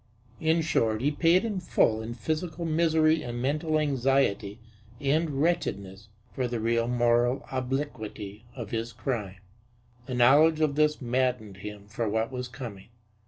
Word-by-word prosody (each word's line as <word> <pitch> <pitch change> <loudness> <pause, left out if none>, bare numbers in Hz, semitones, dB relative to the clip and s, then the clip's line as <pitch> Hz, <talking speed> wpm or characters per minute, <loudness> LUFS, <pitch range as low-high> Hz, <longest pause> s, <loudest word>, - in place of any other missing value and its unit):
In 160 +1 +2
short, 115 -8 +1
he 140 +5 +1
paid 170 +6 +3
in 210 -4 -2
full 110 -10 +2
in 115 +1 -6
physical 160 - -3
misery 160 -1 +3
and 120 -1 -5
mental 155 +5 0
anxiety 135 -8 +1 0.4
and 155 +4 +1
wretchedness 100 - -2 0.3
for 130 -2 -1
the 120 -1 -3
real 115 +1 +1
moral 120 +1 +2
obliquity 125 -6 -4
of 115 -5 -7
his 115 0 -3
crime. 110 -5 -3 0.7
The 130 - -3
knowledge 145 +6 +5
of 155 -2 +2
this 150 0 +2
maddened 125 -5 -1
him 105 0 -8
for 110 +1 -2
what 110 +3 -1
was 125 -1 -4
coming. 120 -6 -8
125 Hz, 145 wpm, -28 LUFS, 110-155 Hz, 0.7 s, knowledge